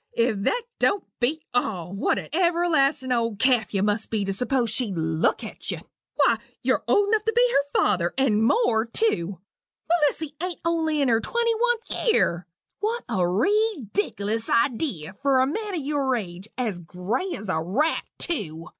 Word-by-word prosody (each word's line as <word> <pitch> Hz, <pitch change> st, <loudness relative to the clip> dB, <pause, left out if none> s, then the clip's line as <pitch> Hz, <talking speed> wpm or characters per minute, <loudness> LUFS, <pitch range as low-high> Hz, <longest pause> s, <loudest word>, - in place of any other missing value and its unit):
If 230 Hz, -1 st, +2 dB
that 485 Hz, 0 st, +1 dB, 0.2 s
don't 400 Hz, -, +2 dB, 0.2 s
beat 295 Hz, +6 st, 0 dB
all! 185 Hz, -8 st, -1 dB
What 200 Hz, -, +1 dB
an -, -, -5 dB
everlastin' 325 Hz, -7 st, +2 dB
old 230 Hz, -3 st, 0 dB
calf 245 Hz, -2 st, +2 dB
you 195 Hz, -2 st, 0 dB
must 210 Hz, +1 st, 0 dB
be 215 Hz, -3 st, -1 dB
to 195 Hz, -, -1 dB
s'pose 245 Hz, +1 st, 0 dB
she'd 215 Hz, -7 st, +1 dB
look 160 Hz, 0 st, 0 dB
at -, -, -5 dB
you. -, -, -1 dB, 0.4 s
Why, -, -, +3 dB, 0.2 s
you're -, -, +1 dB
old 405 Hz, 0 st, +3 dB
enough 435 Hz, -1 st, +2 dB
to 450 Hz, -, +1 dB
be -, -, +5 dB
her 280 Hz, -4 st, +1 dB
father, 175 Hz, -1 st, +2 dB
and 225 Hz, -6 st, +2 dB
more 225 Hz, -, +2 dB
tew 200 Hz, -, -1 dB, 0.5 s
Melissy 315 Hz, -2 st, +1 dB
ain't 360 Hz, -1 st, -3 dB
only 320 Hz, -3 st, +1 dB
in -, -, +2 dB
her 225 Hz, -2 st, +3 dB
twenty 470 Hz, -, 0 dB
oneth 475 Hz, +1 st, -1 dB
year. 175 Hz, -, +1 dB, 0.3 s
What 450 Hz, +4 st, -1 dB
a -, -, -2 dB
reedickilous 225 Hz, -, 0 dB
idee 230 Hz, -, 0 dB
for 275 Hz, -1 st, +3 dB
a 260 Hz, -, +4 dB
man 415 Hz, +8 st, -3 dB
o' 315 Hz, -, -3 dB
your 275 Hz, -2 st, 0 dB
age! 185 Hz, -3 st, -6 dB
as 220 Hz, -8 st, -1 dB
gray 190 Hz, -, -3 dB
as 215 Hz, -, -8 dB
a 160 Hz, -4 st, 0 dB
rat, 250 Hz, -, +1 dB, 0.2 s
tew! 170 Hz, -, -4 dB
255 Hz, 170 wpm, -25 LUFS, -, 0.5 s, be